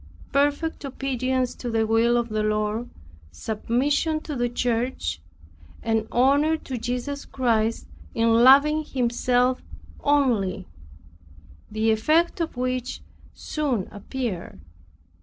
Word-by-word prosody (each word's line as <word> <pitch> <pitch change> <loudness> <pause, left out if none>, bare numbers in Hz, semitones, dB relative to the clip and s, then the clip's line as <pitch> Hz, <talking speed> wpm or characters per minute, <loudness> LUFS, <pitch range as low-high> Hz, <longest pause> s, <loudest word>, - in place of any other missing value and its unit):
Perfect 290 +4 0
obedience 260 -2 -1
to 245 - -6
the 225 -1 +1
will 230 +2 +3
of 235 0 -1
the 215 0 -1
Lord, 215 +2 -1 0.4
submission 255 - 0
to 300 - -6
the 245 -1 0
church, 235 - -2 0.6
and 225 -1 0
honor 285 +6 +3
to 260 -5 -6
Jesus 250 +4 -3
Christ 230 -3 0 0.3
in 230 0 +3
loving 290 +4 +6
Himself 250 -1 +1 0.4
only; 235 -11 +1 1.0
the 220 +1 +1
effect 315 +11 +2
of 325 -6 -3
which 255 0 -2 0.3
soon 270 -11 -2
appeared. 210 -3 -5
245 Hz, 105 wpm, -24 LUFS, 225-275 Hz, 1.0 s, loving